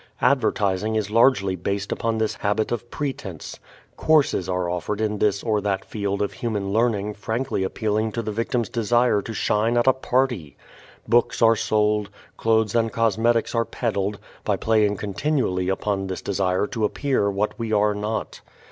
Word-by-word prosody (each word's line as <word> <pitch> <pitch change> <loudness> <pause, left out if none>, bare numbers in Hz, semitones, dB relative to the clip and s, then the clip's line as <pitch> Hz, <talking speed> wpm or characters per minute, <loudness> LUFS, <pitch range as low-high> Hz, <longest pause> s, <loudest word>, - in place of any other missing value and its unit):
Advertising 110 -5 +2
is 105 -1 -1
largely 110 -5 +4
based 100 +3 -3
upon 115 -1 -1
this 110 -1 0
habit 105 +1 0
of 120 0 -3
pretense. 115 - -5 0.4
"Courses" 150 - +2
are 90 -1 0
offered 90 +4 -3
in 105 -1 -1
this 100 -1 +1
or 110 -3 +1
that 95 -1 -1
field 100 -1 -2
of 100 - -3
human 105 -5 -3
learning 105 -2 +1
frankly 110 +3 -2
appealing 110 +2 -1
to 115 - -3
the 110 - -3
victim's 115 +1 -1
desire 120 -1 +2
to 115 - -7
shine 110 +2 +1
at 120 - +3
a 130 - +6
party. 125 - -1 0.5
Books 120 +1 +2
are 115 0 +6
sold, 105 -1 +1 0.3
clothes 110 -2 +1
and 115 -1 +1
cosmetics 115 +1 +1
are 115 -1 +2
peddled, 105 -4 -2 0.3
by - - +1
playing 105 -2 +2
continually 100 -3 -1
upon 95 0 -1
this 95 - -5
desire 95 -1 0
to 110 +1 -4
appear 125 -1 +1
what 100 +4 -2
we 115 -1 -3
are 105 0 +3
not. 105 +2 -4
105 Hz, 165 wpm, -23 LUFS, 100-115 Hz, 0.5 s, a